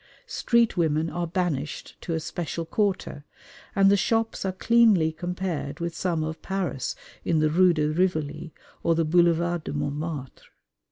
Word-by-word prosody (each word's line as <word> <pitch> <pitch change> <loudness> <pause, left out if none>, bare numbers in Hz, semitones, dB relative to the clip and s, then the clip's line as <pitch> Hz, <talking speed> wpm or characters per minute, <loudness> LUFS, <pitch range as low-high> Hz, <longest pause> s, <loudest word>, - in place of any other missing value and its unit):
Street 235 -3 +2
women 160 -2 +1
are 175 -1 -2
banished 165 -5 -3
to 165 - -3
a - - 0
special 165 +1 -4
quarter, 190 -5 -1 0.5
and 195 0 +5
the - - +6
shops 225 +3 0
are 190 - 0
cleanly 205 -5 +4
compared 175 -3 -4
with 170 0 -3
some 165 -2 -1
of 160 0 -5
Paris 180 -9 -2 0.3
in 165 - +1
the 155 0 +2
Rue 180 +2 +5
de 155 -3 +1
Rivoli 160 -1 -1 0.3
or 165 - +2
the 165 0 +1
Boulevard 170 0 +2
de - - -5
Montmartre. 145 -1 -4
170 Hz, 155 wpm, -26 LUFS, 155-185 Hz, 0.5 s, the